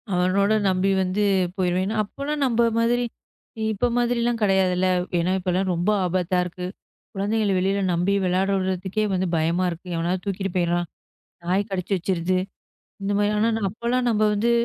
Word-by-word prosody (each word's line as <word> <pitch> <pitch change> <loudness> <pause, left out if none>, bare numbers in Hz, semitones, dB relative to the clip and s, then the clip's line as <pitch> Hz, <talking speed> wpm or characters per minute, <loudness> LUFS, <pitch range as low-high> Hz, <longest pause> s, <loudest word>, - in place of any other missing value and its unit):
அவனோட 190 +3 +2 0.2
நம்பி 185 +1 +1
வந்து 190 +3 0 0.3
போயிருவேன். 185 +1 0
அப்போலாம் 285 +8 -4
நம்ம 235 -2 +2 0.2
மாதிரி, 240 +1 +2 0.7
இப்ப 240 +5 0
மாதிரி 240 0 +1
எல்லாம் 235 0 0
கிடையாதுல்ல. 185 -2 +2 0.3
ஏன்னா, 175 +2 +1
இப்பலாம் 185 +1 0
ரொம்ப 175 +4 0 0.2
ஆபத்தா 180 0 0
இருக்கு. 180 0 -6 0.5
குழந்தைகள 210 +1 0
வெளியில 195 +2 +1
நம்பி 175 +4 +1
விளையாட 185 +2 +1
விடறதுக்கே 190 +2 -1
வந்து 185 0 0
பயமா 165 +3 +1
இருக்கு, 175 +2 -8
எவனாவது 175 +2 -1
தூக்கிட்டு 195 -1 -2
போயிறான், 175 0 +1 0.9
கடிச்சி 190 0 -3
வச்சிருது, 185 0 0 0.6
இந்த 200 +1 -1
மாதிரி. 205 0 +2
ஆனா 225 +2 +3 0.2
அப்பலாம் 235 +5 -1
நம்ம 215 -1 +1
வந்து 220 +3 +1
190 Hz, 145 wpm, -23 LUFS, 180-210 Hz, 0.9 s, ஆனா